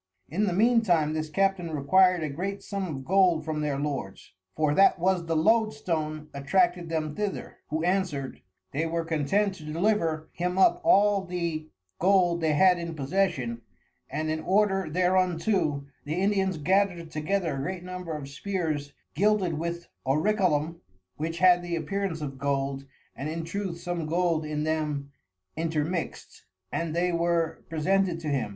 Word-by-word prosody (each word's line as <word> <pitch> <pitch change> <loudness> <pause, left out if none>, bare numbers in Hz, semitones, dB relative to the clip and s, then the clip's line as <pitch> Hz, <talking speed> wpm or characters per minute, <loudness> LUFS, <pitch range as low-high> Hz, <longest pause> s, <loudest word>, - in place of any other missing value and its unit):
In 200 +8 +1
the 185 - 0
mean 230 +5 +4
time 165 -7 +2
this 155 0 -3
Captain 195 0 +1
requir'd 180 +4 +3
a 155 - -2
great 195 +7 -4
Sum 200 -2 -3
of 135 -5 -6
Gold 180 -3 +3
from 155 -1 -2
their 145 -2 -1
Lords 140 -13 -4 0.2
(for 155 -2 +2
that 195 +4 +5
was 180 -1 +1
the 165 - 0
Load 220 +7 +3
stone 155 -3 -3
attracted 175 +4 +1
them 155 -2 -2
thither) 205 +3 -4
who 155 +2 -2
answered, 175 -7 -1 0.3
they 155 +4 -1
were 165 0 -2
content 165 +6 +1
to 180 -5 -12
deliver 165 -1 0
him 180 +1 -2
up 190 - +4
all 200 -1 +4
the 170 -4 -3 0.3
Gold 180 -2 +3
they 160 -2 +2
had 180 +3 +5
in 170 -1 -5
possession; 140 -6 -1 0.5
and 155 +3 -2
in 160 - -1
order 195 0 +1
thereunto, 180 -3 +1 0.2
the 150 +2 -3
Indians 190 -1 +1
gathered 175 0 +1
together 165 +1 -1
a - - -4
great 180 +4 -4
Number 180 -3 -5
of 140 -2 -7
Spears 150 -2 -3 0.2
gilded 195 -1 +2
with 170 +1 -4 0.2
Orichalcum, 165 +1 +1 0.4
(which 165 +2 -3
had 180 -1 +5
the 175 -1 -3
appearance 190 -1 -2
of 135 -3 -5
Gold, 135 0 -1 0.3
and 140 +3 -4
in 165 +1 -3
truth 170 0 -4
some 175 -2 -3
Gold 165 -1 +1
in 150 0 -2
them 150 -3 -2 0.4
intermixt) 160 -1 -3 0.3
and 165 -1 -2
they 180 +1 +1
were 170 -1 0
presented 175 +2 +1
to 155 - -3
him. 135 -7 0
170 Hz, 160 wpm, -27 LUFS, 155-185 Hz, 0.5 s, that